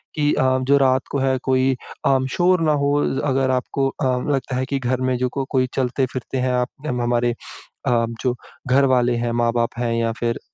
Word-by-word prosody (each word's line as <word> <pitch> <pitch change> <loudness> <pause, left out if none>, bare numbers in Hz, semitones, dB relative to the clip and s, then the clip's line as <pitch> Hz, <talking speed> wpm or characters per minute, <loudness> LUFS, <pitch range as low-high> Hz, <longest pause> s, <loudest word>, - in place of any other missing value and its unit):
कि 150 -1 +2
अ, 130 0 +2
जो 140 +2 +3
रात 130 -1 +2
को 140 - -1
है 130 0 +1
कोई 130 0 +2 0.3
अ, 135 -1 +4
शोर 180 +2 +3
ना 155 - +3
हो 140 - +2 0.2
ज़ - - -1
अगर 135 -1 +1
आपको 135 +1 0
अ, 135 - -4 0.3
लगता 135 -2 -1
है 130 +1 -1
कि 135 +1 -2
घर 130 0 -1
में 130 0 +1
जो 125 0 0
को 135 +1 -3
कोई 130 -1 +2
चलते-फिरते 130 0 -2
हैं 130 0 0
आप 125 0 0 0.2
हम 125 -2 -1
हमारे 120 0 +1 0.6
अ, 120 -2 +3 0.2
जो 125 -2 0 0.3
घर 135 +2 +4
वाले 120 -1 +2
हैं, 120 0 -1
माँ-बाप 120 0 +1
हैं 120 -1 -1
या 115 0 0
फ़िर 115 -1 -1
130 Hz, 210 wpm, -21 LUFS, 120-135 Hz, 0.6 s, अ